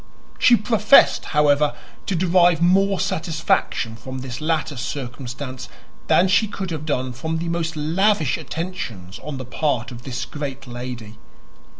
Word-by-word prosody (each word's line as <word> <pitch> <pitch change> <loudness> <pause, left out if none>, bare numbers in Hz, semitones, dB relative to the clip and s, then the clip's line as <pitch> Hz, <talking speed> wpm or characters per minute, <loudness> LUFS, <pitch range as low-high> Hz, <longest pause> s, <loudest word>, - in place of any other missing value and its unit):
She 245 - +7
professed, 220 +3 +4
however, 150 -1 +2 0.3
to 195 - 0
derive 175 -1 +4
more 190 +2 +3
satisfaction 155 -8 -1
from 130 +3 -8
this 130 +1 -6
latter 155 -2 -1
circumstance 130 -1 -6 0.4
than 185 - +4
she 200 +4 +3
could 195 -3 -5
have 155 -1 -5
done 130 -3 -1
from 160 +7 -3
the 170 +1 -3
most 165 -1 -2
lavish 160 -1 +2
attentions 120 - -6
on 150 -2 -6
the 130 - -6
part 125 0 -1
of 120 -1 -9
this 125 0 -4
great 140 -3 -6
lady. 120 -3 -7
150 Hz, 140 wpm, -22 LUFS, 125-175 Hz, 0.4 s, She